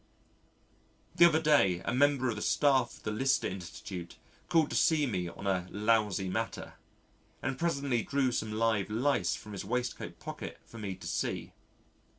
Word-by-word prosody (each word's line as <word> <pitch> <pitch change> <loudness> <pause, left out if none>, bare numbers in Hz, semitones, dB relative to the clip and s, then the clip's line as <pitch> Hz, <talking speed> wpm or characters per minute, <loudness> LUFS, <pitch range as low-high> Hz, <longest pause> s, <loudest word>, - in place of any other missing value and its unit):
The 170 - +7
other 160 -2 +5
day 120 - +3
a 115 - -1
member 140 0 +3
of 115 - -1
the 105 - -5
staff 135 -2 +2
of - - -20
the 110 - -2
Lister 135 +5 +1
Institute 90 -1 -7 0.3
called 165 -3 +3
to - - -2
see 155 -3 +3
me 95 -8 -2
on 85 - -10
a 95 -2 0
lousy 105 -2 +1
matter, 110 +5 -3 0.7
and 130 0 -1
presently 140 -7 0
drew 135 +1 +1
some 110 -2 -2
live 110 -2 +1
Lice 110 -6 +1
from 105 - -10
his 100 - -5
waistcoat 125 +5 -3
pocket - - -7
for 115 - -11
me 100 -3 -4
to - - -12
see. - - -3
115 Hz, 165 wpm, -31 LUFS, 100-140 Hz, 0.7 s, The